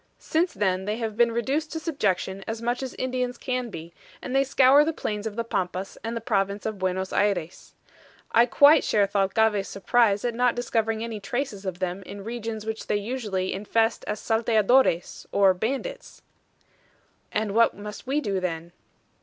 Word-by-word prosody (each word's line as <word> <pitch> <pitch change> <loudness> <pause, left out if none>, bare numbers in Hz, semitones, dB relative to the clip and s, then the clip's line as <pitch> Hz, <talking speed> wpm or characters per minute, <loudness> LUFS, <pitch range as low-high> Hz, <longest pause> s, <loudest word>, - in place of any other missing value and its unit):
Since 335 +3 0
then 190 -1 0
they 210 +2 -2
have 225 -3 -3
been 235 +1 +4
reduced 275 +7 -1
to 320 - -3
subjection 195 - -1
as 225 0 -3
much 240 +2 -1
as 260 -2 -5
Indians 250 -1 -2
can 250 -2 -3
be, 165 -3 -9 0.3
and 255 - -5
they 270 - +5
scour 275 +1 +5
the 325 +2 -1
plains 210 -5 -3
of 210 - -6
the 230 - -1
Pampas 185 -3 -3
and 230 +1 -3
the - - -4
province 200 -2 -1
of 215 -2 -3
Buenos 185 0 -2
Ayres. 185 -4 -1 0.6
I 235 +1 +5
quite 285 +4 +6
share 205 -2 +3
Thalcave's 200 +1 +1
surprise 205 +1 +2
at 240 - 0
not 245 +1 +2
discovering 225 -2 -1
any 230 -2 -5
traces 240 -3 -4
of 180 -2 -3
them 185 +1 -3
in 200 +1 -9
regions 225 -1 -5
which 220 0 -5
they 210 - +1
usually 205 -4 -2
infest 225 +3 0
as 210 - -2
SALTEADORES, 225 -3 +2
or 195 -2 +5
bandits." 275 - -4 1.1
"And 210 -2 -1
what 230 +1 +3
must 210 +3 -8
we 285 +3 +1
do 200 -6 -1
then?" 170 -2 -4
220 Hz, 175 wpm, -25 LUFS, 195-245 Hz, 1.1 s, quite